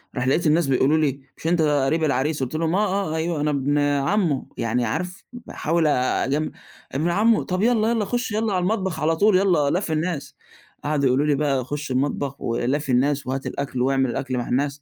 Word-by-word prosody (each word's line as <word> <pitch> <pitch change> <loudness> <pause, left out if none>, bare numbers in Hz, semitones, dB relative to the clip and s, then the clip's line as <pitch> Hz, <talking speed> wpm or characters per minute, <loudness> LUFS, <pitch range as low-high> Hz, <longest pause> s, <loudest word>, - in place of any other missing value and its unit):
راح 130 0 -1
لقيت 155 +4 +2
الناس 155 0 +3
بيقولوا 135 +4 +3
لي: 140 -3 0 0.2
"مش 160 - -5
أنت 170 -1 +2
قريب 150 +1 +1
العريس؟" 140 0 0
قُلت 130 +5 -4
لهم: 165 +2 0
"آه، 195 -4 0
آه، - - -2
أيوه 160 -1 -1
أنا 150 0 +1
ابن 145 +1 0
عمّه." 145 +2 +1
يعني 115 +1 0
عارف 180 - -4
باحاول 170 -9 -1
أجم 140 +2 0 0.4
"ابن 155 +6 0
عمه، 215 +5 +3
طَب 185 +1 -2
يالّا، 225 -1 +3
يالّا 225 -3 0
خُش 245 +2 -2
يالّا 215 -1 0
على 180 - +1
المطبخ 190 -4 -1
على 160 +2 +1
طول 200 +1 +4
يالّا 175 -7 +2
لافي 170 -1 -1
الناس." 155 -1 -3 0.5
قعدوا 145 -2 0
يقولوا 135 +4 +2
لي 145 -2 +2
بقى 135 -3 0
"خُش 145 0 -5
المطبخ 140 +1 -1
ولافي 130 +4 -1
الناس 140 +2 +1
وهات 135 +1 -3
الأكل 135 -3 -3
واعمل 135 -1 +2
الأكل 130 0 -3
مع 120 - -3
الناس." 140 +2 -1
150 Hz, 200 wpm, -23 LUFS, 135-175 Hz, 0.5 s, طول